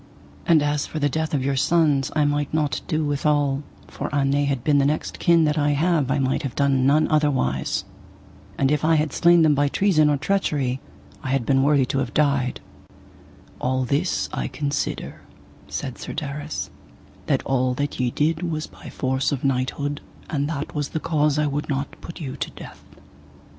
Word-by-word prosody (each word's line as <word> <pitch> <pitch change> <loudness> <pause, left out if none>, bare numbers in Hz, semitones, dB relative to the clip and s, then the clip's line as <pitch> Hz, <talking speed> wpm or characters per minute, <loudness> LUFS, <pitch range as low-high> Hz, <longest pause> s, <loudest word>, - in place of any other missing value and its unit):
And 160 -3 +5
as 145 0 0
for - - -6
the 145 -1 +1
death 160 +2 -2
of 135 -2 -1
your 140 0 +1
sons 145 -1 +2
I 150 -1 +3
might 145 0 0
not 150 -2 0
do 155 -1 0
withal, 145 -1 +1 0.3
for - - -5
an 140 -1 +1
they 145 +1 +2
had 135 -4 -1
been 145 -1 +3
the 140 - +3
next 150 +2 -2
kin 170 -1 +4
that 150 0 +1
I 145 0 +2
have 155 -2 +1
I 135 - +1
might 135 -1 0
have 135 -4 -5
done 135 -2 +2
none 155 +2 +4
otherwise. 130 - +1 0.7
And 135 0 +2
if 150 0 +1
I 160 +1 +4
had 150 -2 0
slain 170 -1 +5
them 155 -1 +5
by 145 0 +2
treason 155 -2 +3
or 145 - +2
treachery 140 -6 0 0.4
I 130 - -5
had 135 -3 0
been 135 +1 +3
worthy 140 -1 +3
to 135 +2 -1
have - - -3
died. 140 -4 +1 1.0
All 130 0 0
this 145 +8 0
I - - -2
consider, 145 -1 -3 0.5
said - - -5
Sir - - -6
Darras, 150 +1 -4 0.6
that - - +1
all 130 -1 +1
that 145 +1 -3
ye 125 -1 +1
did 155 +6 0
was 160 -3 -2
by - - -12
force 130 0 -1
of 140 -3 -3
knighthood, 140 +2 -1 0.3
and 145 -1 0
that 150 -2 -4
was 145 -2 -2
the 160 - -3
cause 150 -3 +1
I 150 - +2
would 145 +1 -2
not 140 0 -3
put 170 - -9
you 135 -5 -5
to - - -3
death. - - -12
145 Hz, 195 wpm, -23 LUFS, 135-155 Hz, 1.0 s, And